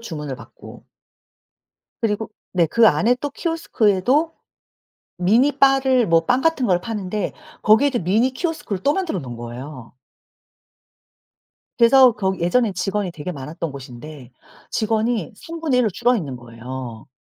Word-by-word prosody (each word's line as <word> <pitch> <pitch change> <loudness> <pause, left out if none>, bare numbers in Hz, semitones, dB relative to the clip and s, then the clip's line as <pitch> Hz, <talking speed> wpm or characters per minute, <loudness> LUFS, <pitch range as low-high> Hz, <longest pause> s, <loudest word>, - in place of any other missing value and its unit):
주문을 150 - -6
받고 - - -14 1.1
그리고 220 0 -1 0.2
네. 175 -3 +3
그 230 +8 +4
안에 235 +4 +3
또 290 +2 -4
키오스크에도 285 - +1 0.8
미니 225 +11 +3
바를 265 -3 +4
뭐 165 -1 +3
빵 250 - +2
같은 320 -4 +1
걸 180 -4 +2
파는데 210 -1 -3 0.3
거기에도 245 +4 +4
미니 220 +9 +2
키오스크를 295 - -4
또 285 - +3
만들어 360 - -2
놓은 125 -4 -8
거예요. 120 +2 -9 1.8
그래서 255 +1 +6
거기 190 -4 -2
예전에 220 +5 +2
직원이 195 +1 -2
되게 160 +2 -6
많았던 155 +3 -6
곳인데 130 0 -10 0.4
직원이 225 +2 -1
1/3 310 -2 -1
로 215 - +1
줄어 240 +6 +2
있는 145 - -4
거예요. 120 0 -8
210 Hz, 280 characters per minute, -21 LUFS, 155-250 Hz, 1.8 s, 그래서